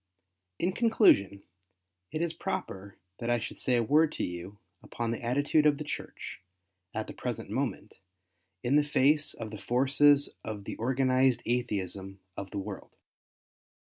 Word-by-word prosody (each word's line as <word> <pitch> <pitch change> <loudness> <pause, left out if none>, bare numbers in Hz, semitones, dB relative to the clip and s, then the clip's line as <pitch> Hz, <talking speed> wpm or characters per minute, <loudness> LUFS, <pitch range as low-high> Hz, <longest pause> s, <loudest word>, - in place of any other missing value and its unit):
In 180 - +1
conclusion, 145 - +4 0.7
it 155 - -1
is 170 -1 -1
proper 100 - -5 0.2
that 120 - -3
I 120 0 +3
should 115 - -6
say 125 - +1
a 120 - +3
word 150 +6 +4
to - - -3
you 90 +3 -5 0.2
upon 115 -1 -3
the 115 - -3
attitude 145 +5 +3
of 145 -1 +3
the 155 - -4
Church, 150 - -6 0.5
at - - -3
the - - -8
pi'esent - - -4
moment, - - -3 0.6
in 130 +4 +3
the 150 - +5
face 145 +1 +2
of 110 -2 -6
the 105 - -8
forces 140 +3 +4
of 105 -2 -5
the - - -5
Organized 130 +1 +2
Atheism 100 -5 -2 0.2
of 100 0 -6
the 100 - -6
world. 95 - -6
125 Hz, 155 wpm, -30 LUFS, 105-145 Hz, 0.7 s, the